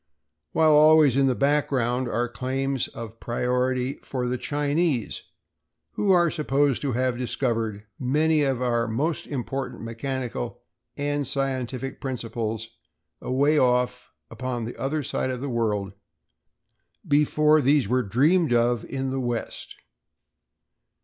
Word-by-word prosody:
while 160 -1 +4
always 150 -3 +6
in 135 0 +4
the 130 - +2
background 130 -3 +1
are 120 +1 0
claims 130 +2 -2
of 115 -1 -9
priority 125 +2 -1
for 125 -2 -3
the 125 +1 -1
Chinese 145 -1 -1 0.7
who 205 - -1
are 175 -3 +5
supposed 145 -3 +1
to 140 -3 -1
have 125 0 0
discovered 115 -4 -2
many 150 +4 +2
of 135 -3 0
our 120 -1 +1
most 145 +9 -1
important 130 -2 -4
mechanical 120 - -4 0.3
and 145 -1 -1
scientific 135 -1 -2
principles 115 -3 -3 0.5
away 145 +4 +2
off 125 - +1 0.2
upon 125 -3 -4
the 120 - -6
other 145 +3 -2
side 130 - -2
of 130 -1 -3
the 140 - -4
world 105 -5 -1 1.1
before 150 +1 +4
these 140 0 +3
were 130 +1 +2
dreamed 145 - +2
of 120 -1 +2
in 135 -1 -3
the 135 - -2
west. 120 -2 -4
130 Hz, 125 wpm, -25 LUFS, 120-145 Hz, 1.1 s, always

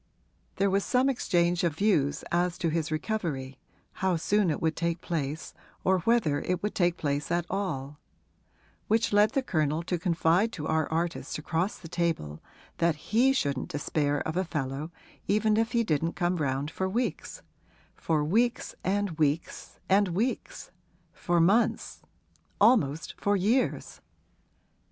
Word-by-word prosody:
There 195 0 +1
was 195 +1 +2
some 255 +1 +2
exchange 175 -7 +1
of 165 -4 +1
views 160 -7 +1
as 175 0 +1
to 170 - 0
his 160 -1 -1
recovery 155 -6 -3 0.4
how 190 -2 +2
soon 200 +3 +1
it 150 - -1
would 160 -1 0
take 170 0 -1
place 155 -4 -4 0.3
or 190 0 +3
whether 175 -7 +2
it 180 0 -2
would 210 - -1
take 175 -2 +1
place 145 -1 -2
at 170 0 0
all; 150 -8 -3 0.9
which 225 0 +1
led 210 +3 +4
the 270 -2 +1
Colonel 155 - 0
to 175 0 -2
confide 175 +4 +2
to 150 - -5
our 160 -1 0
artist 165 +1 -2
across 165 +6 -2
the 170 - -11
table 160 - -2 0.4
that 170 -2 +2
he 230 - +2
shouldn't 140 - -1
despair 145 0 -1
of 160 - -3
a 185 - +1
fellow 150 -2 -4 0.4
even 215 +1 +2
if 225 +2 0
he 235 -1 +3
didn't 165 -3 0
come 175 0 0
round 140 0 -1
for 190 +3 -2
weeks 240 +6 -3 0.5
for 155 -2 0
weeks 230 +10 +1
and 195 -4 -1
weeks 150 +1 -1
and 200 +1 +4
weeks 205 +9 -3 0.4
for 175 0 0
months, 200 +8 +2 0.6
almost 165 - +3
for 205 0 +2
years. 225 +8 0
170 Hz, 150 wpm, -28 LUFS, 155-205 Hz, 0.9 s, led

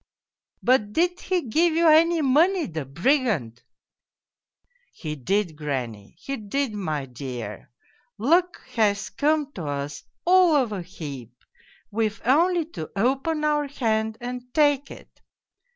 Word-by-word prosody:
" - - -68
' - - -40
But 215 -5 +3
did 355 +4 +1
he 365 -2 -1
give 320 +7 +2
you 335 0 +4
any 325 +1 +5
money, 325 +6 +3
the 155 -4 -5
brigand? 170 - 0 0.5
' - - -68
' - - -42
He 155 -3 -3
did, 175 +5 -1
granny, 125 -9 -5
he 275 +9 -5
did, 225 +4 -2
my 155 -9 -3
dear 125 -5 -7 0.5
luck 340 - +2
has 200 -3 +1
come 295 +6 +1
to 170 - -6
us 140 0 -4 0.2
all 360 -2 +5
of 255 -6 +2
a 200 -3 -3
heap: 140 - -9 0.5
we've 215 0 -1
only 335 +6 +3
to 160 -5 -6
open 270 +8 0
our 295 -1 +1
hand 220 -5 -1
and 250 0 -6
take 290 -2 +3
it.' - - -14
230 Hz, 145 wpm, -24 LUFS, -, 0.5 s, any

